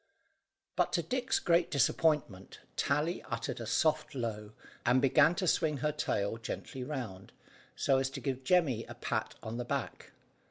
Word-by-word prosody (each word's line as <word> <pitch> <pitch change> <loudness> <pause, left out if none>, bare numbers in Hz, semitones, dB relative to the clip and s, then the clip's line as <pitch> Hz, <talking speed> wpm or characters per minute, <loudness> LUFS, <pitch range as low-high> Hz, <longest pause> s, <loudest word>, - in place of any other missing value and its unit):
But, - - +2
to - - +1
Dick's 255 0 0
great 170 -1 +3
disappointment, 140 - +1 0.2
Tally 160 +4 0
uttered 135 - -3
a 115 - -5
soft 155 +4 +1
low, 110 -4 -4 0.3
and 130 - +4
began 140 +5 +5
to 185 - -1
swing 160 -3 +2
her 150 +2 0
tail 110 -8 -1
gently 125 +3 -5
round, 120 -9 -6 0.4
so 135 -1 +3
as 135 0 0
to - - -4
give 135 -2 -3
Jemmy 135 -7 +3
a 120 - -9
pat 110 -2 -2
on 115 +1 -4
the 125 - -2
back. - - -4
135 Hz, 160 wpm, -32 LUFS, 115-155 Hz, 0.4 s, began